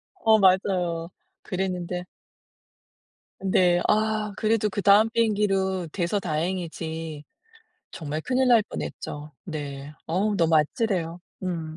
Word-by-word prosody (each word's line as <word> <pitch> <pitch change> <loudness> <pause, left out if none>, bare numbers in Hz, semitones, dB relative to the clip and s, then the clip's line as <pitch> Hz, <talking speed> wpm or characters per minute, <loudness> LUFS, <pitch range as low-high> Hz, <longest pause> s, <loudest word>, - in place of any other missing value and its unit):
어 220 -10 +4
맞아요. 185 -3 +2 0.3
그랬는데 180 -2 -3 1.4
네. 180 -2 +3
아 215 -1 +1
그래도 215 -1 +1
그다음 205 +2 +4
비행기로 195 -5 +1
돼서 195 +2 0
다행이지. 160 -2 -3 0.7
정말 155 -1 -4
큰일 255 +6 +1
날 230 -3 +6
뻔했죠. 150 0 -6
네. 145 -3 -6
어우 200 +5 0
너무 165 -1 +4
아찔해요. 170 +1 0 0.2
음. 165 -3 -4
185 Hz, 225 characters per minute, -25 LUFS, 165-210 Hz, 1.4 s, 날